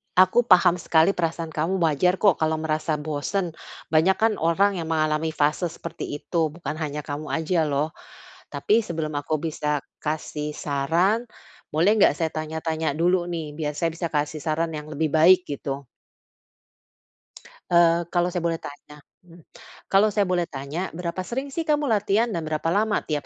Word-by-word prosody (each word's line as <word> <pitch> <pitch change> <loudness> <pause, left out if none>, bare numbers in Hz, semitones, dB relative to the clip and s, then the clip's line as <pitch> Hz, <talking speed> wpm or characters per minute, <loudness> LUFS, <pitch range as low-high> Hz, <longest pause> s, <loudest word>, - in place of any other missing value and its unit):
aku 185 +6 +4
paham 180 -2 +5
sekali 165 +2 +3
perasaan 165 -3 -3
kamu 160 +5 -1
wajar 165 +4 +3
kok 195 -4 +3
kalau 160 0 +1
merasa 155 0 -1
bosen, 155 +5 -2 0.4
banyak 160 +4 +4
kan 225 0 +2
orang 185 +4 +2
yang 160 - -4
mengalami 155 0 0
fase 150 +4 +1
seperti 165 +1 -7
itu, 165 +2 -1
bukan 155 -2 -5
hanya 150 -1 -3
kamu 150 +1 -5
aja 160 0 0
loh. 145 +2 0 0.6
Tapi 220 +2 +2
sebelum 160 -2 -3
aku 150 +2 -2
bisa 150 -2 -2 0.2
kasih 150 -1 -3
saran, 170 - 0 0.5
boleh 170 +6 +4
nggak - - +6
saya 160 -2 -1
tanya-tanya 160 -1 -2
dulu 175 +2 +2
nih, 165 -4 -4
biar 150 -2 -2
saya 165 -1 0
bisa 170 0 -2
kasih 150 +1 -1
saran 165 +1 -1
yang 150 0 -8
lebih 155 +1 0
baik, 180 +4 +6
gitu? 140 -1 -4 1.9
Eee, 170 0 +4
kalau 175 0 +2
saya 175 -1 -3
boleh 165 -1 -1
tanya 145 +1 -11 0.2
mmm, 170 0 -16 0.5
kalau 200 +1 +4
saya 205 0 +2
boleh 175 -1 +1
tanya 140 +3 -6
berapa 175 +2 -4
sering 265 +6 -4
sih 325 +3 -3
kamu 295 -3 +1
latihan 215 +2 +2
dan 170 -6 -3
berapa 155 +1 -1
lama 210 +4 +1
tiap 150 -2 -3
165 Hz, 165 wpm, -24 LUFS, 155-180 Hz, 1.9 s, nggak